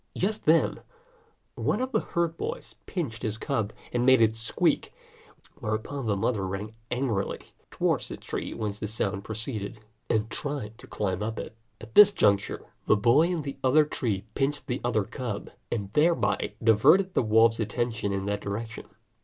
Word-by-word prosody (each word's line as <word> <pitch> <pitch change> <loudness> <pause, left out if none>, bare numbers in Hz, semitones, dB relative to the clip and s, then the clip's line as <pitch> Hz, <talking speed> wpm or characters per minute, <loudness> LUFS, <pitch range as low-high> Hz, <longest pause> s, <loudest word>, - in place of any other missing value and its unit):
Just 215 +3 -1
then, 160 +2 +4 0.7
one - - 0
of 260 +1 -2
the - - +2
herd 170 -1 -1
boys 480 +2 -5
pinched 140 - -3
his 110 -2 -2
cub 110 -2 -1 0.2
and 120 0 +1
made 130 0 +6
it 110 -1 +4
squeak; 115 0 0 0.7
whereupon 110 +5 -3
the 105 - +2
mother 100 -1 0
ran 95 +3 -4 0.2
angrily 125 -6 -2 0.2
towards - - 0
the - - -7
tree - - -5
whence 105 -2 -4
the 105 - -3
sound 100 -2 -2
proceeded, 110 0 -4 0.3
and 110 0 +1
tried 130 -7 -4
to - - -12
climb 95 -2 -2
up 110 +1 -3
it. - - -6 0.2
At 110 0 -12
this 205 +5 +9
juncture, 100 - +1 0.2
the 110 - +5
boy 120 +10 +5
in 175 -4 -1
the 140 -1 -5
other 150 +4 +5
tree 110 -9 -2
pinched 140 +2 -1
the 125 0 -3
other 115 -3 +1
cub, 120 -1 -5 0.2
and 100 -3 -3
thereby 155 -9 +2
diverted 150 - +5
the - - +3
wolf's 115 0 +4
attention 110 -1 -1
in 95 0 -2
that 105 0 -2
direction. 110 +3 -5
115 Hz, 170 wpm, -27 LUFS, 105-140 Hz, 0.7 s, this